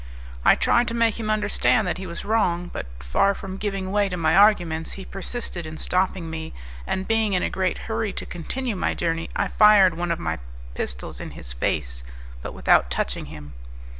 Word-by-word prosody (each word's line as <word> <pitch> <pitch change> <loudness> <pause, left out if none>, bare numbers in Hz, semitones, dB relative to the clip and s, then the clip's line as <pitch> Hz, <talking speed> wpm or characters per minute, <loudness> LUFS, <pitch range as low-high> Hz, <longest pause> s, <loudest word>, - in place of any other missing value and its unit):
I - - +7
tried 240 0 +3
to 230 - -2
make 230 -1 +2
him 215 -1 -3
understand 215 0 +2
that 180 - -2
he 190 - -6
was 170 -1 -5
wrong; 180 -5 +1
but, - - -5
far 195 - +2
from 190 -1 -7
giving 195 -2 -3
way 205 -1 +2
to 180 - -3
my 160 -1 +2
arguments, 175 -6 +4
he 195 - -8
persisted 195 -2 -4
in 155 0 -7
stopping 185 -1 0
me, 160 0 -6 0.3
and 190 - -2
being 225 -2 +2
in 180 - +1
a - - -1
great 185 -1 0
hurry 220 -2 -2
to - - -6
continue 230 +8 -4
my 185 - -1
journey 165 -1 -1
I - - +1
fired 210 -3 +6
one 175 0 -2
of 170 - 0
my 80 - -3 0.3
pistols 60 0 -5
in - - -6
his - - -3
face, - - -2 0.4
but - - -7
without 60 0 +4
touching 65 - -2
him. 75 -1 -10
185 Hz, 195 wpm, -24 LUFS, 165-210 Hz, 0.4 s, I